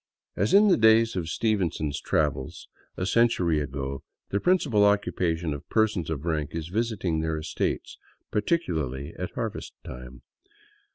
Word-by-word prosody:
As 100 +4 +1
in 210 +1 +7
the 185 - +5
days 110 0 +5
of 85 -3 -2
Stevenson's 85 -9 -1
travels, 75 -4 -1 0.3
a 90 - -1
century 95 -8 +3
ago, 70 -1 -4
" - - -56
the 100 - +1
principal 145 - +3
occupation 90 -6 +1
of 70 - -9
persons 110 -7 +1
of 80 -1 -4
rank 80 -2 -2
is 80 0 -4
visiting 100 -6 -1
their 80 0 -1
estates, 75 +1 -3 0.3
particularly 80 - -1
at 90 - -3
harvest 115 -3 -4
time." 60 0 -10
85 Hz, 145 wpm, -26 LUFS, 75-110 Hz, 0.3 s, in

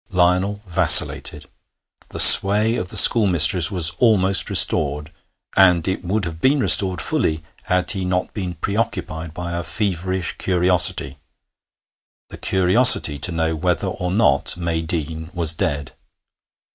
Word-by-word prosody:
Lionel 90 +3 -3
vacillated. 90 - +3 0.6
The - - -12
sway 105 +4 +7
of 90 -6 -7
the - - -6
schoolmistress 90 -6 +4
was 85 -5 +3
almost 100 -5 -1
restored, 75 0 0 0.4
and 90 -3 +1
it 95 - -6
would 95 +2 -5
have 80 -1 -10
been 140 +2 -1
restored 95 -8 +2
fully 80 +2 -4 0.2
had 90 0 -2
he 95 -3 -6
not 90 0 -5
been 90 -4 -8
preoccupied 85 -4 -7
by 85 0 -9
a 85 - -6
feverish 95 -2 -5
curiosity 90 -6 0 1.1
the - - -14
curiosity 95 - +2
to 90 - -1
know 80 -1 -5
whether 90 +4 -4
or 90 -1 -8
not 85 -7 -1
May 85 -2 -5
Deane 80 -1 -8
was 85 -2 +1
dead. 70 -3 -6
90 Hz, 135 wpm, -17 LUFS, 80-95 Hz, 1.1 s, sway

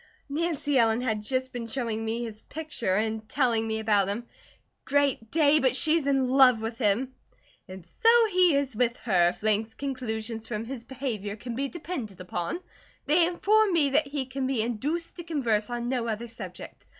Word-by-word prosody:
"Nancy 295 -2 0
Ellen 225 0 +3
had 220 -4 -1
just 260 +4 -2
been 235 -2 -5
showing 230 -3 -2
me 225 +2 -2
his 220 -2 -7
picture 295 -11 -3
and 220 +1 -2
telling 235 -5 +1
me 220 0 -1
about 210 -3 +2
him. 210 +4 -3 0.6
Great 280 -6 +1
Day, 305 0 +4
but 260 -2 +2
she's 310 +2 +3
in 270 -2 +2
love 255 -2 +6
with 225 +2 -5
him!" 240 +4 +1 0.5
"And 185 -2 -10
so 180 - +2 0.2
he 360 -4 +4
is 275 -4 -1
with 240 +1 +1
her, 180 -6 +3
if 180 - -9
Lang's 220 +1 0
conclusions 225 -4 -4
from 225 -1 -4
his 240 -1 -7
behaviour 235 -6 -4
can 235 +3 -7
be 275 +4 -2
depended 275 - -6
upon. 180 - -4 0.4
They 330 +4 +4
inform 410 +3 +3
me 295 -5 +3
that 295 +2 +2
he 275 -1 -3
can 260 +1 -3
be 255 -5 0
induced 290 +11 -3
to 345 - -6
converse 240 -10 0
on 240 0 -3
no 245 -2 -1
other 225 +1 -3
subject. 230 +2 -9
245 Hz, 185 wpm, -27 LUFS, 220-280 Hz, 0.6 s, love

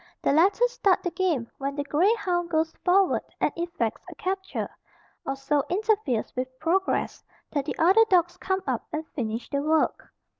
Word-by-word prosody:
The - - +3
latter 390 +10 +4
start 445 -6 +1
the 355 - -1
game 330 -12 0
when 275 +1 -3
the 285 - -2
grey 310 +8 +3
hound 350 -5 -1
goes 320 -1 0
forward 380 +1 +3 0.2
and - - +2
effects 335 -10 -3
a - - -10
capture, 380 +1 -3 0.6
or 270 - -1
so 280 +1 0
interferes 400 - 0
with 255 0 -4
progress, 370 +4 0 0.3
that 285 -3 -1
the - - -4
other 375 +7 +6
dogs 350 -2 +3
come 380 0 -1
up - - -1
and 315 0 -3
finish 230 -3 -4
the 280 - 0
work. 310 +2 0
340 Hz, 175 wpm, -26 LUFS, 280-380 Hz, 0.6 s, other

